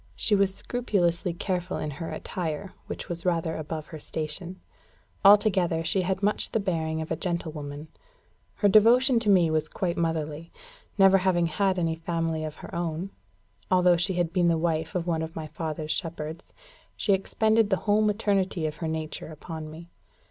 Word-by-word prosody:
She 215 - +1
was 195 -1 +3
scrupulously 185 -8 0
careful 180 +1 -2
in 150 - -3
her 160 +4 -6
attire, 175 +2 -4
which - - -5
was 170 0 -4
rather 165 -3 0
above 155 0 -5
her 155 - -6
station. 160 +5 -5 0.6
Altogether, 195 -5 +5
she 185 +4 +1
had 190 +2 -2
much 210 +1 +1
the 225 - +2
bearing 160 -5 -1
of 160 - -10
a - - +2
gentle 170 -3 -2
woman. 145 0 -7 0.7
Her 205 - +3
devotion 235 +5 +6
to 220 -2 -1
me 175 -5 +5
was 155 -1 0
quite 180 -4 -2
motherly. 160 -1 -2 0.5
Never 195 -1 +6
having 180 -2 +2
had 185 +3 +1
any 165 -2 +1
family 165 -1 -2
of 155 -1 -5
her - - -11
own, 170 +2 -3 0.6
although 180 -1 +5
she 175 +3 0
had 175 -2 -1
been 175 -2 +3
the 165 -1 +3
wife 160 0 -1
of 175 -2 -1
one 165 -2 0
of 160 0 -5
my 160 - -4
father's 155 0 -4
shepherds, 160 -2 -4 0.5
she 200 - +2
expended 220 +3 +2
the 190 - +3
whole 210 0 +4
maternity 200 -5 +1
of 155 0 -3
her 165 - -3
nature 160 -1 -4
upon 155 0 -7
me. 165 +2 -11
170 Hz, 175 wpm, -27 LUFS, 160-195 Hz, 0.7 s, devotion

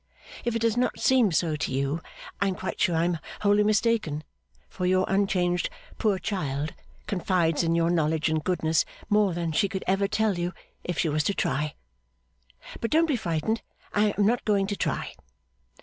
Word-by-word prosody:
If 235 -1 -1
it 230 - -1
does 230 0 +2
not 250 - +1
seem 250 -6 +4
so 160 -1 +1
to 145 - -2
you, 140 +4 -1 0.4
I 200 - +3
am 190 - -1
quite - - -5
sure 175 - +3
I 165 +1 +2
am 175 -2 0 0.2
wholly 205 0 +4
mistaken; 215 -8 +1 0.4
for 180 -1 -3
your 185 0 +3
unchanged 185 -3 +1 0.3
poor 210 -3 +2
child 150 -7 -2 0.3
confides 180 -5 +1
in 165 -1 +1
your 170 0 +2
knowledge 160 -2 +1
and 160 -1 0
goodness 160 -3 +2 0.3
more 205 -4 +3
than 170 -1 -1
she 200 +5 +2
could 190 0 -4
ever 195 +2 +2
tell 210 -3 +1
you 175 +1 -2 0.3
if 175 -2 -3
she 170 - +2
was 155 +1 +1
to 200 - +1
try. 150 +2 -1 1.0
But 230 - -2
don't 325 +2 +4
be 305 -4 +1
frightened, 215 +2 -1 0.3
I 210 0 +2
am 205 - +3
not 235 +3 +2
going 200 -2 +2
to 205 +1 -2
try. - - -2
185 Hz, 185 wpm, -27 LUFS, 165-210 Hz, 1.0 s, seem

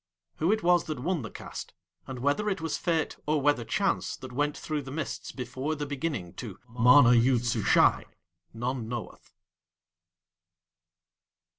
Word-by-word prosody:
Who 165 +5 +2
it 220 -3 0
was 175 -1 +4
that 155 -2 -4
won 165 +5 -1
the 115 - -6
cast, - - -8 0.3
and 130 - -6
whether 145 +12 +1
it 190 - -1
was 160 -1 -2
Fate 165 -3 -1
or 150 0 +2
whether 145 -3 +2
Chance 185 - 0
that 130 -1 -9
went 145 +3 -1
through 155 -2 -3
the 135 - -9
mists 145 +2 -4
before 130 +4 -4
THE 145 -1 -4
BEGINNING 140 - -3
to - - -7
MANA 125 +2 +6
YOOD 120 0 +3
SUSHAI 115 -3 +3 0.5
_none 120 +1 -2
knoweth. 120 0 -7
140 Hz, 150 wpm, -28 LUFS, 125-160 Hz, 0.5 s, MANA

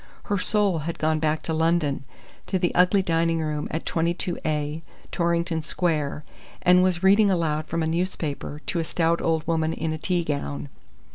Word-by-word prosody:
Her 200 -1 -1
soul 200 -4 +2
had 160 +3 -4
gone 155 0 +1
back 155 0 0
to 160 - -2
London, 160 -4 +1 0.4
to 190 - 0
the 175 -1 0
ugly 180 +2 +4
dining 165 -1 +1
room 150 -2 -2
at 160 - -4
22 170 +2 -1
A, 150 0 -2 0.3
Torrington 170 -1 0
Square, 155 -3 -1 0.4
and 180 0 +6
was 185 -1 +1
reading 200 +2 +6
aloud 155 -4 0
from 165 0 -1
a - - 0
newspaper 160 -3 -3
to 170 - -1
a - - 0
stout 165 +1 0
old 160 -1 0
woman 160 -1 0
in 160 0 -2
a 155 - -5
tea 175 +1 0
gown. 145 -1 -3
165 Hz, 180 wpm, -25 LUFS, 155-175 Hz, 0.4 s, and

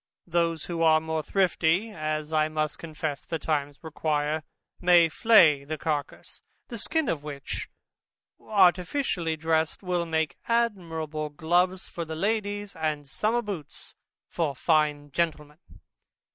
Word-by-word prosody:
Those 170 -2 0
who 170 -1 -3
are 160 -1 +6
more 160 0 -2
thrifty 185 +3 +1
(as 155 -3 -3
I 155 0 +3
must 155 -1 -2
confess 155 -3 -4
the 165 - -3
times 145 -3 -2
require) 155 -1 -1 0.4
may 175 -2 +6
flay 160 - +5
the 155 +2 -4
carcass; 150 -2 -4 0.3
the 235 -3 -5
skin 320 +7 0
of 155 - -1
which, 145 -2 -6 0.7
artificially 180 - +2
dressed, 160 +2 0
will 175 -2 -1
make 160 -3 -1
admirable 165 -10 -1
gloves 175 +5 +1
for 170 - -5
ladies, 205 +4 -2
and 155 -3 -2
summer 220 +11 0
boots 190 -9 -6 0.3
for 155 -5 -2
fine 150 -1 +1
gentlemen. 150 -1 -2
160 Hz, 125 wpm, -27 LUFS, 155-180 Hz, 0.7 s, are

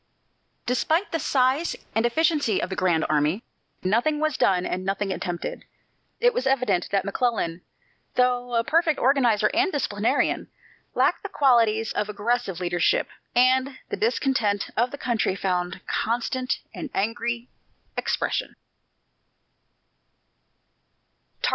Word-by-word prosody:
Despite 315 +10 +1
the 330 - -1
size 270 +4 +1 0.2
and 225 +2 +2
efficiency 295 - +1
of - - -3
the - - -2
"Grand 175 -4 +2
Army," 155 +7 +1 0.4
nothing 235 +11 +1
was 310 -2 0
done 185 -2 +2
and 185 - -2
nothing 195 +1 -1
attempted. 175 -2 -4 0.6
It 485 +1 +4
was 260 - -1
evident 245 -9 +1
that 195 -1 0
McClellan, 200 -5 -1 0.5
though 245 -1 +1
a 230 - +3
perfect 320 +2 +2
organizer 240 -6 +3
and 375 +4 +2
disciplinarian, 215 -7 0 0.5
lacked - - +2
the - - -6
qualities 230 -5 +3
of 210 0 -1
aggressive 210 -2 -1
leadership, 175 -1 +1 0.3
and 260 +2 +3
the - - -2
discontent 265 - 0
of 240 +3 +2
the 285 - -7
country 235 -8 0
found 180 -2 -2
constant 245 +2 -1
and - - -6
angry 235 +3 -1 0.5
expression. - - -1
235 Hz, 120 wpm, -25 LUFS, 195-265 Hz, 0.6 s, It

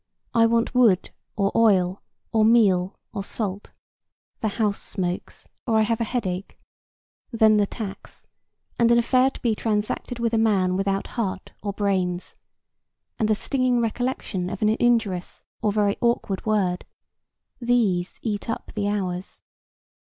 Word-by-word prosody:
I 230 -1 +5
want 230 +2 +1
wood 230 -8 +3 0.2
or 200 -2 +1
oil, 195 -5 +3 0.3
or 220 -1 +3
meal 200 -5 +4 0.2
or 200 - -3
salt; 200 -1 -2 0.7
the 220 - -1
house 210 -1 -1
smokes, 180 -2 -4 0.2
or 225 - +2
I 220 - +5
have 230 +2 0
a - - +1
headache; 195 -6 -3 0.7
then 220 -2 +5
the 205 -1 +2
tax, 205 -3 -8 0.5
and 235 -1 +5
an 235 - +6
affair 255 +2 +4
to - - -12
be 235 -3 +2
transacted 215 +2 -2
with 235 -1 -1
a 225 - +3
man 195 -5 +2
without 195 0 0
heart 195 -5 -4
or 200 - -2
brains, 185 -3 -1 0.8
and 220 -2 +1
the 215 - +4
stinging 255 +1 +1
recollection 230 -5 -2
of - - -4
an 215 - +4
injurious 220 -5 +1 0.2
or 210 - +2
very 205 -1 +1
awkward 230 -4 0
word,—these 205 +1 -2
eat 215 0 -3
up 225 - -4
the 205 -2 -1
hours. 190 -2 -3
215 Hz, 145 wpm, -24 LUFS, 195-230 Hz, 0.8 s, an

